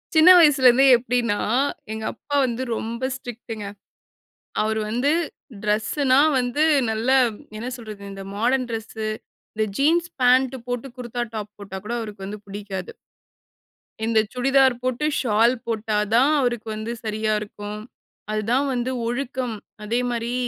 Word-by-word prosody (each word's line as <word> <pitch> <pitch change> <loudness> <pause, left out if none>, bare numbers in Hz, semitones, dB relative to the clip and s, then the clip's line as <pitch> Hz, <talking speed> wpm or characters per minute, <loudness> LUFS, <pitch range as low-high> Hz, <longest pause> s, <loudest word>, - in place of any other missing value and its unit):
சின்ன 315 +3 +8
வயசுலேருந்து 270 -5 +6
எப்டின்னா, 235 -3 0 0.5
எங்கப்பா 220 +6 -4
வந்து 245 +1 -2
ரொம்ப 235 +4 -3
ஸ்ட்ரிக்ட்ங்க. 235 -4 -7 1.0
அவரு 220 +1 0
வந்து 245 +6 +1 0.5
டிரெஸ்னா 255 +6 +2 0.2
வந்து 250 +4 0 0.3
நல்ல 220 +3 -1 0.5
என்ன 230 +3 -5
சொல்றது? 215 -4 -9
இந்த 195 0 -8
மாடர்ன் 250 +4 +1
டிரெஸ்ஸு, 220 -1 -4 0.5
இந்த 215 0 +1
ஜீன்ஸ் 330 +5 +2
பாண்ட் 255 +1 +4
போட்டு 245 +1 -3
குர்தா 240 -1 -3
டாப் 210 -1 -5
போட்டா 195 -1 -7
கூட 235 - -3
அவருக்கு 210 -4 -7
வந்து 210 +2 -6
புடிக்காது. 200 -2 -6 1.1
இந்த 225 -1 +3
சுடிதார் 265 0 +4
போட்டு 255 +3 -1 0.2
ஷால் 230 0 +3
போட்டா 220 -1 -1 0.2
தான் 265 +5 +5
அவருக்கு 240 -4 -1
வந்து 215 +2 -4
சரியா 215 0 -1
இருக்கும். 210 0 -7 0.5
அதுதான் 225 +6 +1
வந்து 245 +1 -1 0.2
ஒழுக்கம். 250 -1 -3 0.3
அதே 230 +3 0
மாரி 235 0 -2
235 Hz, 125 wpm, -23 LUFS, 215-255 Hz, 1.1 s, சின்ன